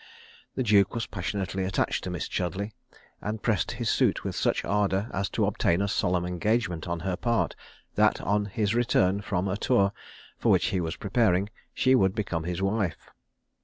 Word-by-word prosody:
The 130 - 0
duke 105 -3 +4
was 115 - -1
passionately 95 0 -3
attached 95 0 0
to - - -3
Miss 90 0 -3
Chudleigh; 95 +4 -2 0.5
and 105 +1 -4
pressed 110 -7 +1
his - - -3
suit - - +2
with - - -3
such - - 0
ardour 100 +1 0
as 100 +1 -1
to - - +1
obtain 85 +1 +1
a 100 - +1
solemn 90 -3 0
engagement 90 -1 -1
on 85 -1 -3
her 95 +1 -1
part, 115 +4 0 0.4
that - - +3
on 105 +1 0
his 105 +1 -1
return 100 -5 +2
from 100 -2 -1
a 95 +1 -1
tour, 105 -4 +2 0.5
for - - +3
which - - +3
he 95 - 0
was 80 0 -3
preparing, 100 -2 +1 0.2
she 130 - +3
would 95 -7 +3
become 90 -7 -2
his 90 +2 -2
wife. 95 -3 -1
100 Hz, 180 wpm, -27 LUFS, 90-105 Hz, 0.5 s, duke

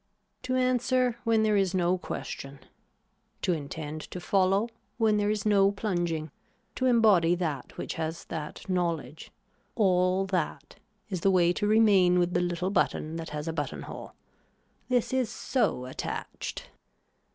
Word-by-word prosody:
To 255 - -2
answer 255 -1 +1
when 225 -1 +3
there 215 -1 +3
is 195 -2 +2
no 180 0 +2
question, 140 -5 -6 0.9
to 180 - +2
intend 155 0 -5
to 180 - -6
follow 195 +5 +2 0.3
when 220 -2 +3
there 205 0 +1
is 210 -1 -1
no 200 -2 +4
plunging, 175 -7 -2 0.4
to 260 - 0
embody 210 -8 +5
that 160 -6 -4
which - - -4
has 160 +1 -4
that 155 +2 -6
knowledge, 170 -4 -2 0.5
all 185 -2 +3
that 185 -5 -3 0.3
is 185 -3 -2
the 195 - +3
way 175 -2 +4
to 205 - -1
remain 205 -5 +5
with 175 0 +1
the 175 - +2
little 180 +1 -1
button 165 -4 0
that 165 -1 -6
has 150 +1 -5
a 165 - -2
button - - -4
hole. - - -9 0.8
This 250 0 +1
is 255 -4 +1
so 240 - -1
attached. 130 - -6
185 Hz, 150 wpm, -28 LUFS, 170-215 Hz, 0.9 s, embody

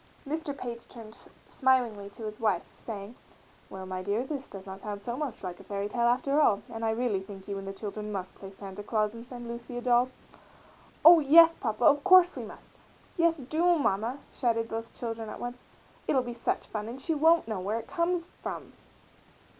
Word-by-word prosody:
Mr. 295 -1 -3
Page 235 -3 -6
turned 225 -2 -12 0.2
smilingly 245 -7 +1
to 210 +3 -11
his 215 0 -6
wife, 210 -6 0
saying, 205 -1 -7 0.6
"Well, 190 0 -7
my 185 0 -4
dear, 205 +5 0
this 275 0 -5
does 195 -1 -9
not 190 0 -8
sound 205 0 -5
so 235 +4 -4
much 275 -6 -4
like 180 -2 -5
a - - -12
fairy 200 0 -3
tale 235 +2 +1
after 275 +5 +2
all, 210 -7 +3
and 225 0 -5
I 225 - +2
really 220 -3 0
think 195 0 -11
you 200 -1 -3
and 195 - -8
the - - -3
children 210 +1 -5
must 190 -2 -4
play 195 - -10
Santa 195 0 -9
Claus 215 0 0
and 230 +1 -10
send 245 -2 -8
Lucy 235 +1 -6
a - - -3
doll." 245 0 +3 1.0
"Oh, 335 0 +11
yes, 325 +3 +8
Papa, 225 -6 -1
of 290 -2 +5
course 370 -1 +7
we - - -4
must! - - -12 0.4
Yes, 335 -1 +3
do, 320 +6 +2
Mamma!" 230 -1 0 0.2
shouted 230 -3 0
both 225 +1 -5
children 225 -2 -4
at - - -7
once. 245 +1 -6 0.5
"It'll 260 -2 +3
be 240 -1 -5
such 235 - -2
fun 215 -1 -5
and 240 +3 -6
she 325 +5 -1
won't 320 -1 +4
know 215 -4 -2
where 205 +4 -1
it 230 - -5
comes 340 +2 0 0.2
from." - - -6
235 Hz, 205 wpm, -29 LUFS, 205-270 Hz, 1.0 s, Oh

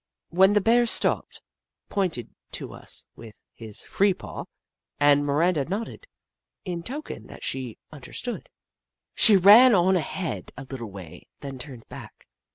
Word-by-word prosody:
Then 190 +4 +5
the 210 - +3
Bear 235 +3 +4
stopped, - - 0 0.5
pointed 180 - -2 0.2
to - - -5
us - - -6
with 115 -2 -13
his 110 -3 -6
free 195 -1 +1
paw, - - -8 0.5
and 145 0 +5
Miranda 150 +2 +1
nodded, 220 - -5 0.6
in 175 -2 -4
token 280 - -7
that - - -12
she 130 -4 -4
understood. 155 - -6 0.6
She 210 -3 +6
ran 210 +6 +8
on 185 +1 +3
ahead 165 - -3
a 135 - -7
little 130 -4 -7
way, 95 -5 -11
then 135 -2 -7
turned 125 -4 -9
back. - - -12
170 Hz, 140 wpm, -25 LUFS, 130-200 Hz, 0.6 s, ran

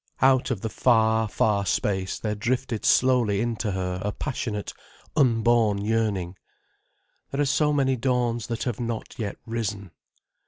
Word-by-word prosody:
Out 130 0 +4
of 115 -7 -2
the 110 - -3
far, 110 -1 +3
far 105 -1 +1
space 95 -1 -1
there 105 -1 -2
drifted 120 +1 -2
slowly 120 -6 +3
in 120 +1 -1
to 105 -3 -2
her 90 -1 -3
a 105 - -1
passionate, 110 -5 -4 0.4
unborn 115 -5 +3
yearning. 105 -5 -1 0.9
"There 135 - -4
are 145 - +3
so 150 +2 +2
many 135 -2 +2
dawns 120 -2 0
that 115 -1 -3
have 120 -5 -3
not 115 -2 -4
yet 105 -3 -3
risen." 105 -5 -4
115 Hz, 150 wpm, -25 LUFS, 105-125 Hz, 0.9 s, Out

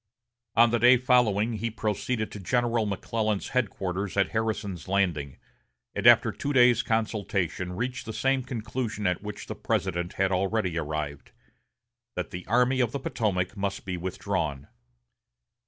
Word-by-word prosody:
On 115 0 +6
the 120 - +2
day 125 +3 +7
following 120 -3 +3
he 115 +3 -2
proceeded 110 +1 -2
to 105 - -7
General 120 +2 +1
McClellan's 105 +1 -1
headquarters 100 -5 -2
at 100 - +3
Harrison's 110 -6 -2
Landing, 85 -8 0 0.6
and - - +1
after - - +7
two 145 - -3
days' 125 -2 +6
consultation 100 -6 -1
reached 125 +4 -3
the - - -3
same 135 +5 +1
conclusion 115 -3 -4
at 90 -1 +1
which 105 -1 -7
the - - -5
President 85 -2 -2
had 95 0 +1
already 95 -1 0
arrived, 75 -3 -4 0.8
that - - -4
the 90 0 -7
Army 125 +4 +3
of 120 -2 +1
the 140 - -2
Potomac 100 -6 -1
must 100 -1 -3
be 95 -1 -3
withdrawn. 80 -5 -3
105 Hz, 145 wpm, -27 LUFS, 95-120 Hz, 0.8 s, day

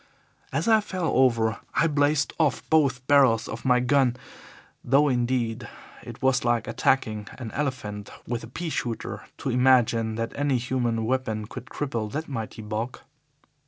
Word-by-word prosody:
"As - - -1
I 220 -1 +5
fell 185 -5 -2
over 115 -4 +3 0.2
I - - +3
blazed 145 -1 +2
off 155 -4 +1
both 135 -5 +3
barrels 135 -6 +4
of 115 - -6
my 125 -1 +4
gun, 125 0 +2 0.7
though, 140 +4 +4
indeed, 120 -2 -1 0.3
it - - -10
was 130 -1 +3
like 120 -2 +1
attacking 110 -5 0
an 115 -3 -6
elephant 105 -8 -4 0.2
with 120 -1 -3
a - - -8
pea 160 +7 -5
shooter 120 -4 -4
to 135 - -3
imagine 120 -3 +3
that 115 0 -3
any 145 -2 +1
human 120 -2 -1
weapon 110 -4 -1
could 125 +3 -9
cripple 115 -8 -3
that 155 +2 -3
mighty 115 -4 -5
bulk. 110 +4 -4
125 Hz, 155 wpm, -26 LUFS, 115-140 Hz, 0.7 s, I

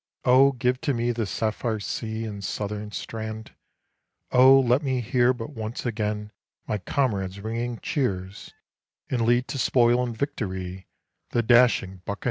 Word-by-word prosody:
Oh, 135 +2 +6
give 125 0 0
to 145 -5 0
me 120 +1 0
the 115 -3 -2
sapphire 110 +1 -2
sea 110 +2 -4
and 100 -2 -6
southern 105 +2 -4
strand! 110 0 -6 0.8
Oh, 130 +2 +7
let 125 +1 +3
me 130 -4 -1
hear 120 +1 +2
but 125 +2 -5
once 115 -2 -5
again 105 -2 -2 0.3
my 105 - -2
comrades' 100 -3 -1
ringing 115 +3 -3
cheers, 105 - -2 0.6
And 125 -3 0
lead 120 +2 +2
to 135 - -3
spoil 120 0 +3
and 120 -2 -4
victory 95 - -4 0.4
the 120 - +1
dashing 120 -5 +4
buccaneers. 100 +1 -5
115 Hz, 145 wpm, -25 LUFS, 105-125 Hz, 0.8 s, Oh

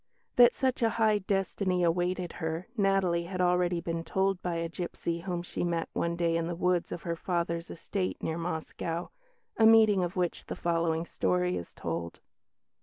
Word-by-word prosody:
That 245 0 +7
such 260 -1 0
a 230 - +4
high 215 -2 +4
destiny 190 -2 0
awaited 175 +1 0
her, 160 +2 -2
Natalie 195 -5 +2
had 185 +1 -5
already 180 -1 +2
been 165 0 -3
told 190 +1 0
by 175 -1 -2
a 165 0 -1
gipsy 170 0 -4
whom 175 0 -3
she 175 - -4
met 170 -1 -1
one 170 0 0
day 170 -1 +1
in 165 0 -1
the 175 - -3
woods 180 0 +1
of 170 - -5
her 170 -1 -2
father's 170 -1 -2
estate 185 +2 -3
near 160 +1 -2
Moscow 165 0 -3 0.5
a 220 - +6
meeting 215 -4 +6
of 175 0 -3
which 180 -2 -2
the - - -4
following 165 -1 0
story 90 - 0
is 85 -1 -6
told. 85 0 -4
175 Hz, 180 wpm, -30 LUFS, 165-185 Hz, 0.5 s, That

